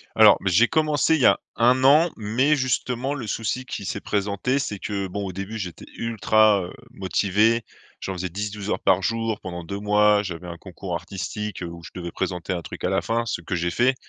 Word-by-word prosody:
Alors, - - +8
bah, 95 - 0
j'ai 115 +6 +6
commencé 155 +1 +2
il 145 - -1
y - - +5
a - - +5 0.2
1 125 +2 +3
an, 155 +5 +6
mais 125 +8 +2
justement 130 0 -1
le 125 -7 -5
souci 115 +4 -2
qui 100 - -6
s'est - - -3
présenté, 105 +6 -1
c'est 105 -7 -3
que, 100 -1 -3
bon, 100 +2 -4
au 95 - -4
début 100 +4 -5
j'étais 90 -6 -6
ultra, 110 -2 +3
heu, 90 - -8 0.2
motivé, 105 +1 +1 0.4
j'en 95 - -3
faisais 95 0 -3
10-12 105 +2 -5
heures - - -1
par 95 0 +3
jour 115 +1 -1
pendant 85 -2 -6
2 100 +4 -5
mois. 105 0 +4
J'avais 90 -3 -6
un 85 -1 -7
concours 90 0 -6
artistique, 95 +3 -5
heu, - - -4
où 85 0 -9
je - - -10
devais 85 -2 -5
présenter 90 -1 -3
un 90 -2 -2
truc - - -9
à - - +1
la - - +1
fin, 115 +1 -1
ce 105 - -2
que 85 +2 -4
j'ai 85 0 -1
fait, 130 +2 +2
105 Hz, 220 wpm, -24 LUFS, 95-115 Hz, 0.4 s, Alors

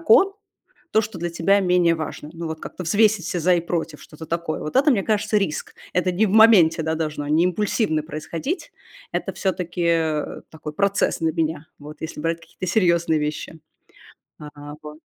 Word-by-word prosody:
кон, 390 +3 +5 0.6
то, 220 - +4
что 210 -4 -6
для 175 +1 -2
тебя 185 +4 +3
менее 180 -2 +3
важно. 155 -1 -6
Ну, 170 0 -6
вот 160 0 -5
как-то 180 - -7
взвесить 210 0 +3
все 175 - -2
за 180 +2 +4
и - - +1
против, 165 -3 -3
что-то 160 +1 -11
такое. 170 -1 -3
Вот 155 - -4
это, 285 +3 +5
мне 200 -5 +1
кажется, 215 +1 0
риск. 195 -7 -1 0.2
Это 180 0 +1
не 205 +5 +2
в - - -2
моменте, 200 -7 +6
да, 160 0 -1
должно, 150 -2 -3
не 155 +3 +3
импульсивно 185 -3 0
происходить. 165 - -5 0.4
Это - - -2
всё-таки, 180 -2 -2 0.6
такой 155 -1 -8
процесс 200 +4 +1
для 160 -1 0
меня, 160 -2 -2
вот, 150 +1 -10
если 160 -1 -6
брать 165 +1 -1
какие-то 185 - -8
серьезные 170 -4 +2
вещи, 150 +2 -4 0.8
а, 150 -1 -10
вот. 150 0 -10
170 Hz, 180 wpm, -22 LUFS, 155-195 Hz, 0.8 s, моменте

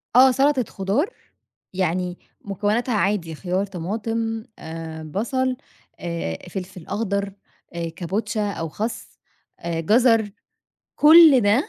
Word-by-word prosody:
آه، 260 +1 +8
سلطة 270 0 +3
خضار 210 - -1 0.6
يعني 180 -1 -1 0.2
مكوناتها 210 +5 -1
عادي 190 -6 0
خيار، 185 +3 -1
طماطم، 220 +5 -3 0.2
آآ 160 0 -7
بصل، 255 - -1 0.4
آآ 170 - -3
فلفل 185 -3 -7
أخضر، 200 -1 -2 0.4
آآ 170 -1 -3
كابوتشا 205 +5 -2
أو 165 -4 -4
خس، 220 +7 -5 0.4
آآ 170 -1 -3
جزر، 225 +3 +3 0.7
كل 310 -3 +8
ده 230 - +2
205 Hz, 110 wpm, -23 LUFS, 175-230 Hz, 0.7 s, آه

